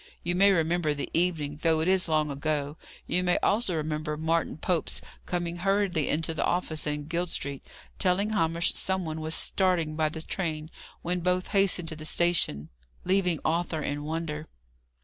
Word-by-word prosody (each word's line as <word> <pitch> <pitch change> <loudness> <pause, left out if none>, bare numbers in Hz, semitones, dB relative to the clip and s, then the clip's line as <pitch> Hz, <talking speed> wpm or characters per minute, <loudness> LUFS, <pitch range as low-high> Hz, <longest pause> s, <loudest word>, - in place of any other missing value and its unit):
You 175 - +1
may 200 +3 +6
remember 165 -3 +1
the 145 - -4
evening, 155 -4 0
though 165 -1 +3
it 160 - 0
is 185 -2 +3
long 155 -2 +2
ago. 145 0 -2 0.3
You 180 - +1
may 180 -1 +3
also 200 -4 +2
remember 150 -1 -2
Martin 160 0 0
Pope's 170 0 0 0.3
coming 175 -1 -2
hurriedly 195 -4 +1
into 160 +2 0
the - - -1
office 160 -4 0
in 150 0 -2
Guild 170 +2 -1
Street, 140 -4 -3 0.4
telling 195 +3 +2
Hamish 170 -3 +1
some 190 -1 -1
one 160 0 -4
was 160 +1 0
starting 175 -5 +1
by 155 -1 +2
the 160 +1 -6
train; 160 -4 -3 0.3
when 180 +1 0
both 180 +1 0
hastened 195 -4 +2
to 160 - -5
the 155 - -9
station, 160 - +1 0.4
leaving 180 -3 +2
Arthur 160 -1 0
in 145 +1 -3
wonder. 155 0 -3
165 Hz, 170 wpm, -28 LUFS, 155-180 Hz, 0.4 s, may